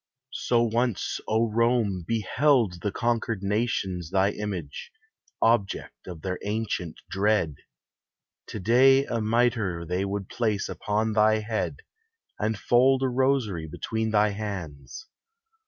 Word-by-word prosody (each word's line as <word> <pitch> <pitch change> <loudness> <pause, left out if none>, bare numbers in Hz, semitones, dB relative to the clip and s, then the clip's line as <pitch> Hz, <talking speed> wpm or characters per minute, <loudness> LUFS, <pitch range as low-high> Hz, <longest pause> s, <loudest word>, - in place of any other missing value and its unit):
So 120 -1 +1
once, 120 -2 -1
O 110 +2 +2
Rome, 115 -5 +1
beheld 115 - +2
the 105 - -1
conquered 115 -2 -1
nations 100 -5 -1
Thy 95 +2 +2
image, 100 - -6 0.5
object 115 -4 0
of 85 -4 -8
their 90 -1 -3
ancient 105 -5 -3
dread. 100 -4 +1 0.9
To 110 - -6
day 130 +7 +5
a 115 -4 -2
mitre 110 -6 +1
they 90 +3 -1
would 100 -1 -3
place 110 -4 -1
upon 110 +1 -1
Thy 110 0 +4
head, 110 - -3 0.6
and 110 0 0
fold 130 +5 +3
a 130 - +2
rosary 125 -10 0
between 110 +8 -3
Thy 105 -1 +3
hands. 100 - -6
110 Hz, 120 wpm, -26 LUFS, 95-120 Hz, 0.9 s, day